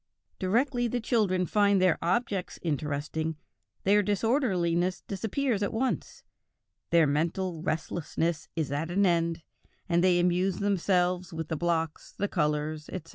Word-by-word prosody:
"Directly 240 Hz, +6 st, +1 dB
the 245 Hz, +1 st, -1 dB
children 210 Hz, -6 st, +1 dB
find 200 Hz, 0 st, +3 dB
their 185 Hz, -3 st, +3 dB
objects 195 Hz, 0 st, -1 dB
interesting, 155 Hz, 0 st, -2 dB, 0.5 s
their 205 Hz, +2 st, +4 dB
disorderliness 190 Hz, -, +1 dB
disappears 220 Hz, +3 st, -1 dB
at 200 Hz, -, 0 dB
once; 255 Hz, +3 st, -2 dB, 0.7 s
their 165 Hz, -1 st, +5 dB
mental 165 Hz, +4 st, -1 dB
restlessness 165 Hz, 0 st, -2 dB
is 155 Hz, -4 st, -1 dB
at 150 Hz, +3 st, -2 dB
an 195 Hz, +3 st, +2 dB
end, 170 Hz, -2 st, +1 dB, 0.4 s
and 175 Hz, -1 st, +2 dB
they 180 Hz, -1 st, +4 dB
amuse 180 Hz, +1 st, +1 dB
themselves 185 Hz, -2 st, +1 dB
with 160 Hz, -1 st, -5 dB
the 160 Hz, -, -1 dB
blocks, 165 Hz, -1 st, -2 dB
the 205 Hz, -, 0 dB
colors, 150 Hz, -2 st, -1 dB
etc." 170 Hz, -3 st, -7 dB
180 Hz, 130 wpm, -28 LUFS, 160-200 Hz, 0.7 s, their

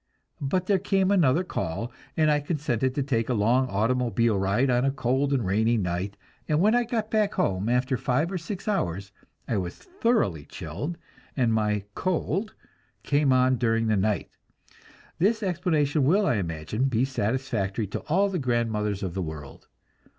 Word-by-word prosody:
But 175 Hz, +7 st, 0 dB
there 195 Hz, 0 st, +2 dB
came 195 Hz, 0 st, +1 dB
another 170 Hz, -4 st, +3 dB
call, 110 Hz, -, -3 dB, 0.3 s
and 155 Hz, -1 st, +4 dB
I 150 Hz, -, +3 dB
consented 140 Hz, -5 st, -1 dB
to 140 Hz, -, 0 dB
take 120 Hz, -4 st, -1 dB
a 125 Hz, -, +1 dB
long 120 Hz, +5 st, +2 dB
automobile 115 Hz, 0 st, +1 dB
ride 100 Hz, +7 st, +1 dB
on 125 Hz, 0 st, +2 dB
a 135 Hz, -, +3 dB
cold 135 Hz, +1 st, 0 dB
and 130 Hz, -6 st, +1 dB
rainy 110 Hz, +5 st, +2 dB
night, 95 Hz, +1 st, -2 dB, 0.3 s
and 150 Hz, 0 st, +2 dB
when 210 Hz, +5 st, +4 dB
I 245 Hz, 0 st, +3 dB
got 225 Hz, -2 st, -2 dB
back 215 Hz, -2 st, +1 dB
home, 95 Hz, +3 st, 0 dB
after 125 Hz, +2 st, +1 dB
five 145 Hz, +10 st, 0 dB
or 185 Hz, -, -2 dB
six 185 Hz, +4 st, -7 dB
hours, 100 Hz, -, -1 dB, 0.4 s
I 110 Hz, -, 0 dB
was 90 Hz, -2 st, -3 dB
thoroughly 230 Hz, -, 0 dB
chilled, 105 Hz, -, -6 dB, 0.4 s
and 120 Hz, -4 st, +2 dB
my 105 Hz, -2 st, +1 dB
"cold" 185 Hz, -, -1 dB, 0.5 s
came 145 Hz, -1 st, +2 dB
on 130 Hz, 0 st, +4 dB
during 115 Hz, -1 st, +1 dB
the 110 Hz, -1 st, +2 dB
night. 100 Hz, -1 st, 0 dB, 0.9 s
This 215 Hz, +5 st, +2 dB
explanation 160 Hz, -6 st, +1 dB
will, 190 Hz, +10 st, +3 dB
I 120 Hz, -, +2 dB
imagine, 85 Hz, +6 st, -2 dB
be 130 Hz, -2 st, +2 dB
satisfactory 115 Hz, -4 st, -1 dB
to 100 Hz, -, -4 dB
all 190 Hz, +6 st, +3 dB
the 190 Hz, -3 st, -2 dB
grandmothers 110 Hz, -6 st, -1 dB
of 90 Hz, -3 st, -3 dB
the 95 Hz, -, -2 dB
world. 75 Hz, -4 st, -8 dB
130 Hz, 170 wpm, -26 LUFS, 105-165 Hz, 0.9 s, and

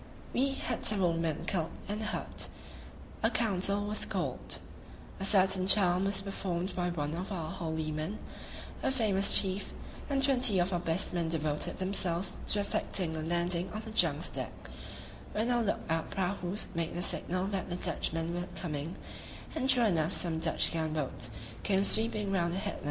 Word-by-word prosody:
We 270 Hz, +2 st, +2 dB
had 240 Hz, -, -3 dB
several 190 Hz, -5 st, +3 dB
men 165 Hz, -2 st, -1 dB
killed 165 Hz, -4 st, 0 dB, 0.2 s
and 210 Hz, +2 st, -3 dB
hurt; 215 Hz, -, -1 dB, 0.7 s
a -, -, +4 dB
council 200 Hz, -2 st, +1 dB
was 210 Hz, +1 st, 0 dB
called; -, -, -2 dB, 0.6 s
a 195 Hz, -, -1 dB
certain 190 Hz, -2 st, +5 dB
charm 190 Hz, -2 st, +4 dB
was 195 Hz, 0 st, +1 dB
performed 190 Hz, -2 st, -3 dB
by 180 Hz, -1 st, 0 dB
one 150 Hz, -3 st, -2 dB
of 180 Hz, +5 st, -4 dB
our 165 Hz, -4 st, -3 dB
holy 160 Hz, -4 st, -3 dB
men, 155 Hz, +7 st, -3 dB, 0.6 s
a -, -, +1 dB
famous 210 Hz, -6 st, +4 dB
chief, 195 Hz, 0 st, -2 dB, 0.4 s
and 275 Hz, -1 st, +1 dB
twenty 255 Hz, -6 st, +5 dB
of 180 Hz, +1 st, +2 dB
our 175 Hz, -, +1 dB
best 165 Hz, +1 st, 0 dB
men 170 Hz, -2 st, 0 dB
devoted 155 Hz, -2 st, 0 dB
themselves 190 Hz, -1 st, 0 dB
to 205 Hz, -, +1 dB
effecting 185 Hz, -4 st, +1 dB
a 160 Hz, -, -3 dB
landing 175 Hz, +2 st, +1 dB
on 215 Hz, -, -3 dB
the 220 Hz, -, -6 dB
junk's 165 Hz, -5 st, +3 dB
deck, -, -, -4 dB, 0.6 s
when 225 Hz, +3 st, +1 dB
our 240 Hz, -1 st, +3 dB
look 210 Hz, -, 0 dB
out 165 Hz, 0 st, -1 dB
prahus 190 Hz, +1 st, -1 dB
made 165 Hz, -1 st, -2 dB
the 175 Hz, -, -1 dB
signal 180 Hz, +1 st, +1 dB
that 195 Hz, -3 st, -3 dB
the 175 Hz, -, -2 dB
Dutchmen 165 Hz, -1 st, -2 dB
were 175 Hz, +1 st, -3 dB
coming; 155 Hz, -1 st, -4 dB, 0.6 s
and 265 Hz, -4 st, -1 dB
sure 250 Hz, -3 st, +6 dB
enough 165 Hz, -4 st, +1 dB
some 165 Hz, -2 st, 0 dB
Dutch 165 Hz, -, +2 dB
gun 160 Hz, -1 st, -1 dB
boats 140 Hz, -5 st, -2 dB, 0.3 s
came 195 Hz, -1 st, +2 dB
sweeping 215 Hz, -1 st, +2 dB
round 175 Hz, -2 st, +1 dB
a -, -, -2 dB
headland. 195 Hz, -, -3 dB
185 Hz, 175 wpm, -32 LUFS, 165-200 Hz, 0.7 s, sure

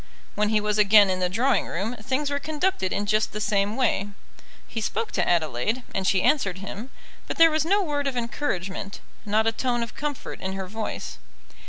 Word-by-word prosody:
When 210 Hz, 0 st, +1 dB
he 215 Hz, -1 st, +3 dB
was 210 Hz, 0 st, 0 dB
again 205 Hz, -1 st, +7 dB
in 185 Hz, -, -1 dB
the 180 Hz, -1 st, +1 dB
drawing 245 Hz, +8 st, +1 dB
room, 205 Hz, +8 st, -3 dB
things 265 Hz, +6 st, -1 dB
were 285 Hz, -, 0 dB
conducted 305 Hz, -, -1 dB
in 205 Hz, -, -1 dB
just 215 Hz, +1 st, +1 dB
the 210 Hz, -, -3 dB
same 205 Hz, 0 st, +1 dB
way. 230 Hz, -6 st, +1 dB, 0.6 s
He 225 Hz, -, -4 dB
spoke 225 Hz, -, -2 dB
to -, -, 0 dB
Adelaide, 165 Hz, -, 0 dB
and 190 Hz, -1 st, -1 dB
she 190 Hz, -2 st, +3 dB
answered 195 Hz, -, +2 dB
him; 200 Hz, +5 st, -7 dB, 0.4 s
but -, -, -4 dB
there 330 Hz, 0 st, +7 dB
was 310 Hz, 0 st, +1 dB
no 400 Hz, +4 st, +3 dB
word 290 Hz, -4 st, -1 dB
of 265 Hz, -2 st, -2 dB
encouragement 200 Hz, -6 st, -3 dB, 0.3 s
not 215 Hz, +2 st, +2 dB
a 225 Hz, -, +3 dB
tone 240 Hz, +1 st, -1 dB
of 230 Hz, -, -7 dB
comfort 290 Hz, -2 st, -5 dB
in 190 Hz, 0 st, -3 dB
her 190 Hz, 0 st, -4 dB
voice. 215 Hz, -, -5 dB
215 Hz, 200 wpm, -25 LUFS, 195-265 Hz, 0.6 s, again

